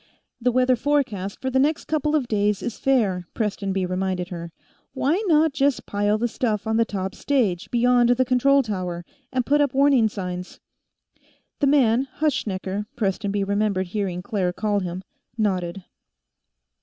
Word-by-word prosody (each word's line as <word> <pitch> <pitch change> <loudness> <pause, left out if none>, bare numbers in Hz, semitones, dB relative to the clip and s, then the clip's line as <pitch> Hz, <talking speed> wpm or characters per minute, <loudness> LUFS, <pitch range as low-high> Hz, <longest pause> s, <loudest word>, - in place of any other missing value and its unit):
"The 250 +1 +2
weather 255 +1 +3
forecast 225 -8 -1
for 260 - -1
the 265 - +2
next 300 +3 +1
couple 305 0 0
of 275 -5 0
days 210 -2 0
is 235 - -4
fair," 200 -10 +1
Prestonby 195 -3 -1
reminded 185 0 -2
her. 170 -2 -7 0.4
"Why 295 +9 +1
not 315 -2 +4
just 280 -1 +1
pile 205 +1 +1
the 240 +2 0
stuff 220 -3 -2
on 220 0 0
the 230 - +3
top 190 -3 -4
stage, 220 -12 0
beyond 245 0 +3
the 250 +1 +3
control 275 +2 +3
tower, 180 -5 -4 0.3
and 255 -2 0
put 290 +1 +3
up 280 -3 0
warning 270 -5 +4
signs?" 180 -3 -6 1.0
The 285 - +2
man 265 -2 +3
Hutschnecker, 210 -9 -1
Prestonby 200 -2 -1
remembered 200 -2 0
hearing 185 -3 -3
Claire 190 -6 -1
call 205 +1 0
him 180 0 -5 0.3
nodded. 185 -4 -1
215 Hz, 155 wpm, -23 LUFS, 190-260 Hz, 1.0 s, not